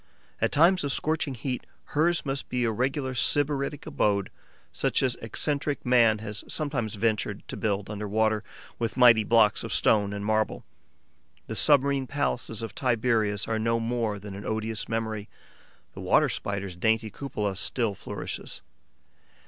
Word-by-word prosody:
At -, -, +2 dB
times 175 Hz, +4 st, +4 dB
of 140 Hz, -, -1 dB
scorching 155 Hz, -2 st, -1 dB
heat, 125 Hz, +1 st, -4 dB, 0.3 s
hers 170 Hz, +3 st, +2 dB
must 135 Hz, 0 st, -3 dB
be 125 Hz, -1 st, 0 dB
a 115 Hz, -, +1 dB
regular 130 Hz, +3 st, -1 dB
sybaritic 145 Hz, +2 st, +1 dB
abode, 100 Hz, -2 st, 0 dB, 0.4 s
such -, -, +1 dB
as 130 Hz, -2 st, +2 dB
eccentric 140 Hz, +4 st, -2 dB
man 120 Hz, -3 st, +5 dB
has 105 Hz, -1 st, -5 dB
sometimes 135 Hz, -9 st, -1 dB
ventured 105 Hz, -1 st, -1 dB
to -, -, -4 dB
build 100 Hz, -2 st, -1 dB
under 105 Hz, 0 st, -5 dB
water, 110 Hz, +1 st, +1 dB, 0.4 s
with 115 Hz, +1 st, -2 dB
mighty 120 Hz, -3 st, +7 dB
blocks 110 Hz, -1 st, +3 dB
of -, -, -5 dB
stone 105 Hz, -2 st, +3 dB
and 100 Hz, 0 st, -4 dB
marble. 110 Hz, 0 st, 0 dB, 0.8 s
The -, -, -5 dB
submarine 140 Hz, -2 st, +4 dB
palaces 125 Hz, -5 st, -2 dB
of 110 Hz, -3 st, -5 dB
Tiberius 110 Hz, -4 st, +1 dB
are 110 Hz, -1 st, -1 dB
no 115 Hz, +1 st, +1 dB
more 115 Hz, -2 st, -1 dB
than 100 Hz, 0 st, -9 dB
an 100 Hz, +1 st, -7 dB
odious 110 Hz, 0 st, -3 dB
memory; 110 Hz, -2 st, -3 dB, 0.6 s
the -, -, -8 dB
Water -, -, +3 dB
Spider's 100 Hz, -2 st, -3 dB
dainty 110 Hz, +3 st, +1 dB
cupola 105 Hz, -6 st, -3 dB
still 115 Hz, +2 st, 0 dB
flourishes. -, -, -6 dB
115 Hz, 150 wpm, -27 LUFS, 105-135 Hz, 0.8 s, mighty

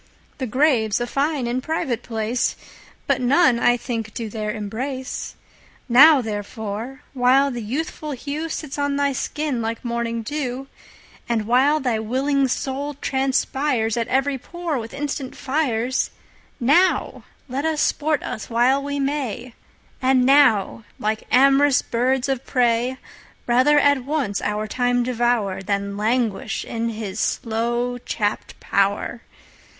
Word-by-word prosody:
The 260 Hz, -, -2 dB
Grave's 240 Hz, -4 st, +2 dB
a 240 Hz, -, -1 dB
fine 275 Hz, +1 st, -1 dB
and 245 Hz, +2 st, -1 dB
private 265 Hz, -6 st, -2 dB
place, 225 Hz, +1 st, -1 dB, 0.5 s
But -, -, +1 dB
none 250 Hz, -1 st, +4 dB
I 245 Hz, 0 st, +4 dB
think 225 Hz, -3 st, -5 dB
do 225 Hz, -3 st, -4 dB
there 215 Hz, -1 st, -3 dB
embrace. 250 Hz, +5 st, -5 dB, 0.5 s
Now 275 Hz, +4 st, +8 dB
therefore, 220 Hz, +4 st, -5 dB
while 265 Hz, +2 st, +4 dB
the 240 Hz, -2 st, -4 dB
youthful 295 Hz, +6 st, -4 dB
hewSits 295 Hz, +2 st, -5 dB
on 285 Hz, 0 st, 0 dB
thy 280 Hz, -1 st, +1 dB
skin 285 Hz, -1 st, -2 dB
like 225 Hz, +2 st, -4 dB
morning 235 Hz, -1 st, -2 dB
[dew]And 250 Hz, -4 st, -5 dB
while 265 Hz, +7 st, +3 dB
thy 245 Hz, -6 st, 0 dB
willing 270 Hz, +5 st, +1 dB
Soul 275 Hz, +3 st, -3 dB
transpiresAt 265 Hz, -4 st, 0 dB
every 270 Hz, +1 st, 0 dB
pore 345 Hz, -2 st, -4 dB
with 225 Hz, 0 st, -7 dB
instant 275 Hz, -2 st, -4 dB
Fires, 260 Hz, -3 st, 0 dB, 0.5 s
Now 325 Hz, +10 st, +2 dB, 0.2 s
let 265 Hz, +2 st, -3 dB
us 320 Hz, -1 st, 0 dB
sport 300 Hz, -1 st, +1 dB
us 215 Hz, -, -5 dB
while 245 Hz, +4 st, +3 dB
we 285 Hz, 0 st, -3 dB
may; 270 Hz, -4 st, -3 dB, 0.5 s
And 260 Hz, -1 st, +3 dB
now, 230 Hz, -6 st, +4 dB
like 215 Hz, +1 st, -2 dB
am'rous 275 Hz, +2 st, +5 dB
birds 250 Hz, +2 st, 0 dB
of 270 Hz, -2 st, -1 dB
prey, 245 Hz, 0 st, +1 dB, 0.5 s
Rather 255 Hz, +5 st, +4 dB
at 285 Hz, -2 st, +4 dB
once 275 Hz, -8 st, -1 dB
our 210 Hz, +1 st, -1 dB
Time 245 Hz, +2 st, +1 dB
devour, 240 Hz, -6 st, 0 dB
Than 200 Hz, 0 st, -2 dB
languish 220 Hz, 0 st, -1 dB
in 230 Hz, 0 st, -2 dB
his 215 Hz, -3 st, -5 dB
slow 235 Hz, +3 st, -1 dB
chapt 210 Hz, -3 st, -3 dB
pow'r. 200 Hz, +4 st, 0 dB
250 Hz, 130 wpm, -22 LUFS, 230-280 Hz, 0.5 s, Now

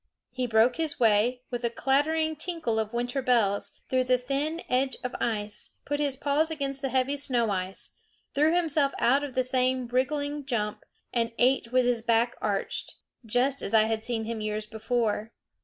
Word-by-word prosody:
He 250 Hz, 0 st, -2 dB
broke 225 Hz, +2 st, +3 dB
his 320 Hz, -3 st, -1 dB
way, 235 Hz, +2 st, +3 dB
with 245 Hz, 0 st, -3 dB
a 235 Hz, -, +2 dB
clattering 315 Hz, +6 st, +1 dB
tinkle 320 Hz, -8 st, -2 dB
of 220 Hz, -1 st, -2 dB
winter 245 Hz, +3 st, -1 dB
bells, 230 Hz, -6 st, +2 dB, 0.2 s
through 255 Hz, 0 st, +1 dB
the 255 Hz, 0 st, +4 dB
thin 280 Hz, +6 st, -2 dB
edge 260 Hz, +1 st, +1 dB
of 250 Hz, -, -3 dB
ice, 210 Hz, -2 st, -2 dB
put 290 Hz, +1 st, -1 dB
his 285 Hz, -3 st, 0 dB
paws 290 Hz, +3 st, +1 dB
against 275 Hz, -3 st, -3 dB
the 270 Hz, -, -1 dB
heavy 265 Hz, +2 st, +1 dB
snow 245 Hz, -6 st, 0 dB
ice, 185 Hz, 0 st, -3 dB, 0.4 s
threw 300 Hz, +3 st, +3 dB
himself 305 Hz, -5 st, +2 dB
out 270 Hz, +4 st, +3 dB
with 285 Hz, -3 st, -6 dB
the 255 Hz, -, +3 dB
same 255 Hz, 0 st, +1 dB
wriggling 285 Hz, +4 st, -1 dB
jump, 215 Hz, -6 st, -2 dB, 0.3 s
and 230 Hz, -1 st, 0 dB
ate 250 Hz, -1 st, +2 dB
with 255 Hz, 0 st, +3 dB
his 245 Hz, -2 st, +1 dB
back 230 Hz, +1 st, +2 dB
arched 200 Hz, -2 st, -2 dB, 0.3 s
just 255 Hz, +5 st, +1 dB
as 200 Hz, -, -1 dB
I 215 Hz, -, +7 dB
had 220 Hz, 0 st, -1 dB
seen 230 Hz, -2 st, -1 dB
him 225 Hz, 0 st, -4 dB
years 215 Hz, 0 st, -2 dB
before. 220 Hz, 0 st, -1 dB
250 Hz, 180 wpm, -28 LUFS, 225-280 Hz, 0.4 s, I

